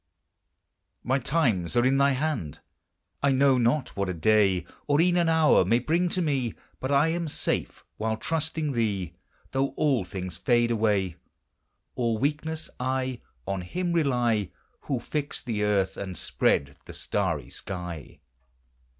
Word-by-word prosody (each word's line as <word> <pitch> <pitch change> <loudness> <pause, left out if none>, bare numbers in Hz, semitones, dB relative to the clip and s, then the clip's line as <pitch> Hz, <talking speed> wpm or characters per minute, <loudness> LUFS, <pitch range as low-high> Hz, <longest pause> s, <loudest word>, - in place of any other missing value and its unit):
My 130 +2 +1
times 120 - +1
are 120 - +4
in 135 +1 +3
thy 140 0 +4
hand! 130 - -2 0.6
I 140 - +3
know 135 -1 +4
not 125 +4 +1
what 100 -1 -1
a 90 - -2
day 95 0 +3 0.2
Or 145 0 +3
e'en 175 +1 +4
an 170 -2 +3
hour 160 -1 +5
may 115 - +3
bring 170 +8 +1
to 180 +1 0
me, 135 -7 -1 0.2
But 130 - -3
I 140 +3 +4
am 170 0 -1
safe 145 - -3
while 110 0 -1
trusting 160 +2 -2
thee, 100 - -1 0.4
Though 135 0 0
all 135 -8 +2
things 90 -2 -6
fade 120 -1 +2
away. 105 -6 +1 0.8
All 115 -2 0
weakness, 155 +5 -2
I 130 -1 -1 0.2
On 95 -1 -2
him 175 - -2
rely 120 - +1 0.4
Who 135 -4 -1
fixed 145 +3 -4
the 110 -4 -1
earth 100 -2 +1
and 95 -3 -5
spread 70 -1 0
the - - -10
starry - - -2
sky. 90 -6 -7
125 Hz, 150 wpm, -27 LUFS, 100-145 Hz, 0.8 s, hour